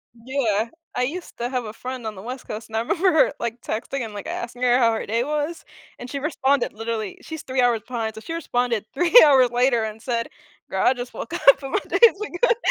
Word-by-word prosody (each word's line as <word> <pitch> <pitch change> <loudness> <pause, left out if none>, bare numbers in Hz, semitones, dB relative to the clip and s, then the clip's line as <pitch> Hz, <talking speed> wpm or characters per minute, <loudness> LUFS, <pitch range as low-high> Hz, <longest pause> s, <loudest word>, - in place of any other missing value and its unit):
Yeah, 230 -3 -1 0.3
I 250 - +1
used 340 +7 -5
to 240 +1 -2
have 250 -3 -2
a 215 - -7
friend 250 -2 -6
on 215 - -5
the 190 - -9
west 255 +4 -7
coast, 220 +1 -7
and 220 - -3
I - - +2
remember 370 - +2
her, 315 - +4
like, 235 0 -4
texting 245 +4 -3
and, 215 -2 -7
like, 205 - -7
asking 245 +1 -5
her 245 0 +5
how 230 -2 +4
her 220 - -3
day 230 +3 0
was, 300 +3 -3 0.4
and 245 - -8
she 280 - -4
responded, 280 -3 0
literally, 225 -2 -4
she's 320 -2 -8
3 260 0 0
hours 240 -3 +2
behind, 225 -3 -3
so 220 - -9
she 330 - -6
responded 245 -9 -1
3 340 +7 0
hours 260 -4 +5
later 245 -1 +2
and 220 0 -5
said, 235 -2 -2 0.4
"Girl, - - 0
I 260 - +5
just 245 -1 -7
woke 230 - -7
up 275 0 +5
and 270 - -5
my - - +2
day - - 0
is 455 -4 +7 0.2
good." 475 -2 +4
245 Hz, 240 wpm, -23 LUFS, 225-275 Hz, 0.4 s, is